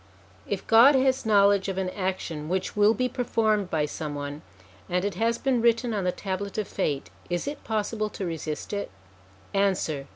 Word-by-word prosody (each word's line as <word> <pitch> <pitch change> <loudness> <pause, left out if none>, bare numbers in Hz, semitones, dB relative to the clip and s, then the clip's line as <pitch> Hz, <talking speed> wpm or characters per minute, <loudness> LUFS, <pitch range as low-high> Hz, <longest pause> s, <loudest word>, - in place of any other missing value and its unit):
If 200 -2 -3
God 235 +6 +7
has 260 -2 +2
knowledge 200 -2 +4
of 190 - -3
an 185 -1 -1
action 185 -6 -3
which 185 +1 -2
will 210 +2 +4
be 255 - +1
performed 220 -5 0
by 155 -3 +1
some 150 0 -5
one, 145 +1 -5 0.5
and 180 +2 0
it 205 - -1
has 230 +4 +1
been 260 -3 +1
written 235 0 +2
on 200 -3 -1
the 180 - +2
Tablet 195 +2 -4
of 215 - -1
Fate, 145 -8 -2 0.2
is 175 +8 -2
it 290 - -5
possible 215 0 -1
to 195 - -5
resist 160 +1 -4
it? 200 - -3 0.6
Answer. 185 -8 0
200 Hz, 185 wpm, -26 LUFS, 180-225 Hz, 0.6 s, God